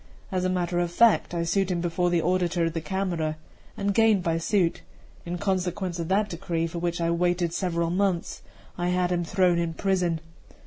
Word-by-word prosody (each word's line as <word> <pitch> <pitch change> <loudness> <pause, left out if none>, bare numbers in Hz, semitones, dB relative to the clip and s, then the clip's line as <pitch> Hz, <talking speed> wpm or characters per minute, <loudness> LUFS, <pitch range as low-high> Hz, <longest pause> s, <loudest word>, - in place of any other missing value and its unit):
As 185 -1 0
a 185 - +1
matter 175 -1 0
of 175 -1 0
fact, 230 +4 +4
I 170 -1 -1
sued 190 +3 +1
him 180 -2 0
before 175 +1 0
the 170 -2 +1
auditor 175 -1 +1
of 165 - -2
the 165 - -2
Camera, 170 -4 -2 0.4
and 200 0 0
gained 220 -3 +4
by 165 -2 0
suit; 175 0 +1 0.5
in 175 +1 -3
consequence 185 -1 -2
of 165 - -3
that 205 +3 +2
decree, 170 -3 -2
for 165 +1 -4
which 175 0 -2
I 170 0 +1
waited 175 0 +1
several 170 -2 -1
months, 185 -2 -1 0.4
I 175 - 0
had 180 0 +1
him 175 -1 +1
thrown 180 0 +2
into 165 -1 -3
prison. 180 -4 +1
175 Hz, 195 wpm, -26 LUFS, 170-185 Hz, 0.5 s, fact